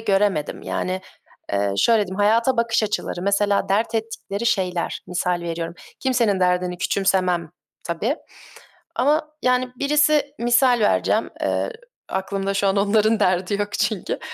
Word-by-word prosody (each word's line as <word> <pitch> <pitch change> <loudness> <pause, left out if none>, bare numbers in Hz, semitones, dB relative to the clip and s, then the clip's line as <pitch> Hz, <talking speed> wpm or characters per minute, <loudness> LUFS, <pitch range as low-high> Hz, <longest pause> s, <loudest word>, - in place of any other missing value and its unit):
göremedim. 195 -7 0
Yani, 185 0 -2 0.5
eee, 100 0 +1
şöyle 230 - +4
diyeyim: 190 +1 -6
Hayata 230 +5 +3
bakış 230 -1 +1
açıları, 205 -4 -2
mesela, 200 +1 +1
dert 220 +4 +1
ettikleri 225 -1 -3
şeyler, 180 -5 0
misal 180 0 -1
veriyorum. 170 0 -4 0.3
Kimsenin 235 -7 +1
derdini 180 0 +1
küçümsemem 185 -4 +1 0.3
tabii 205 - -1 0.8
ama, 305 +3 +1
yani, 250 0 +2
birisi, 295 +1 +2
misal 240 +1 +4
vereceğim, 210 - +2
eee - - 0 0.4
aklımda 195 +1 -2
şu 195 0 +1
an 195 - +2
onların 215 +2 +3
derdi 185 +2 +1
yok 205 0 -1
çünkü. 215 -6 -1
205 Hz, 130 wpm, -22 LUFS, 185-235 Hz, 0.8 s, şöyle